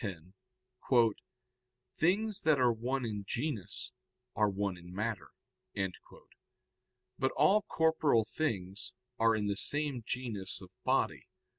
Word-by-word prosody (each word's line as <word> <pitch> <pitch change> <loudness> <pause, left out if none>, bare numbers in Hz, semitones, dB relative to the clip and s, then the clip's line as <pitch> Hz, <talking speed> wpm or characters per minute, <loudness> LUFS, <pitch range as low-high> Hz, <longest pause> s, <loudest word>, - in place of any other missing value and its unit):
10): 95 -5 -6 1.6
"Things 200 +5 +2
that 155 -3 +4
are 125 -1 +5
one 125 +3 -2
in 105 -3 -3
genus 115 - -2 0.4
are 105 -1 +3
one 100 -1 -1
in 90 0 -12
matter." 105 0 -3 1.9
But 130 - +2
all 190 +9 +5
corporeal 160 - +3
things 100 -8 -3 0.3
are 115 0 +5
in 105 -1 -1
the 100 -1 0
same 140 +2 0
genus 110 -6 -3
of 95 -2 -13
body. - - +1
115 Hz, 115 wpm, -33 LUFS, 100-145 Hz, 1.9 s, are